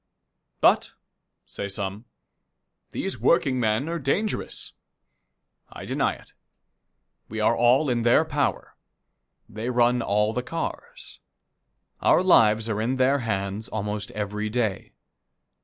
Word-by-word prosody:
"But," - - +3 0.5
say 100 - -6
some, 100 +2 -5 0.8
"these 195 - -4
workingmen 130 -5 +2
are 170 0 -3
dangerous." 195 +10 -2 1.0
I - - -9
deny - - 0
it. - - -19 1.0
We 110 - -5
are 110 +2 +3
all 125 +6 +4
in 120 -2 0
their 120 +1 +4
power. - - -2 0.7
They 110 +4 -5
run 120 0 +2
all 105 +1 +1
the 125 - -1
cars. 475 - -6 0.8
Our - - +4
lives 110 -10 +4
are 110 -1 -1
in 125 +4 0
their 130 +2 +2
hands 100 -2 -3
almost 105 -1 -4
every 105 0 -3
day. 110 -4 -2
115 Hz, 115 wpm, -25 LUFS, 105-130 Hz, 1.0 s, all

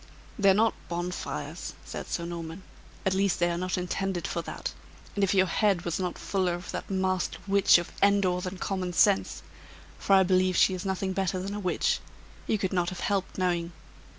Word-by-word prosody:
"They're 195 -1 +6
not 225 +2 +3 0.2
bonfires," 175 +1 -4
said - - -6
Sir 170 - -2
Norman; 170 +1 -6 0.4
"at 190 - +2
least 195 -1 +2
they 175 0 +2
are 170 - -2
not 185 0 -1
intended 180 0 -2
for - - -2
that; - - -5 0.4
and 200 - 0
if 195 0 +2
your 190 -1 +5
head 190 0 +1
was 170 0 -1
not 180 -1 -2
fuller 185 -3 0
of 175 +1 -7
that - - -5
masked 185 -1 0
Witch 200 -2 +6
of 175 - -4
Endor 200 -3 +3
than 185 +1 -5
common 185 -2 -2
sense 200 +3 +3 0.6
(for 195 - +2
I 190 -1 +7
believe 185 0 +2
she 190 - +5
is 185 +1 -5
nothing 190 0 -1
better 190 -1 0
than 195 +2 -4
a 210 - -3
witch), 185 -3 +1 0.5
you 220 - +2
could 190 -2 -2
not 175 -1 +1
have 185 - -7
helped 200 -4 -1
knowing. 175 -2 0
185 Hz, 195 wpm, -28 LUFS, 180-195 Hz, 0.6 s, I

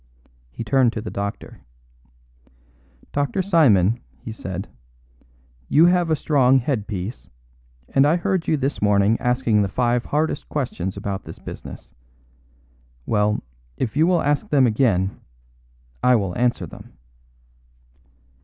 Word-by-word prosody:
He - - -7
turned 120 +1 +3
to 110 - -4
the 105 - -6
doctor. 100 0 -6 1.5
"Dr. 145 +7 -1
Simon," 120 - +4 0.2
he 65 - -8
said, 95 -2 -6 1.0
"you 160 +3 +6
have 175 -1 +3
a 160 - +3
strong 135 -3 +3
head 125 -5 -1
piece, 100 +3 -5 0.6
and 135 - +3
I 155 - +3
heard 185 -1 -1
you 155 - +2
this 140 +1 -2
morning 105 +1 +3
asking 125 -3 +2
the 100 - +1
five 120 +4 0
hardest 155 +2 -1
questions 100 -10 -3
about 100 -1 -4
this - - -9
business. - - -10 1.1
Well, 105 -1 +1 0.3
if 120 -2 -2
you 155 +3 +4
will 175 -2 +2
ask 145 0 0
them 140 -3 +4
again, 105 -5 +1 0.8
I 125 0 +5
will 100 -5 -1
answer 120 -6 0
them." 80 - -13
120 Hz, 130 wpm, -22 LUFS, 105-145 Hz, 1.5 s, you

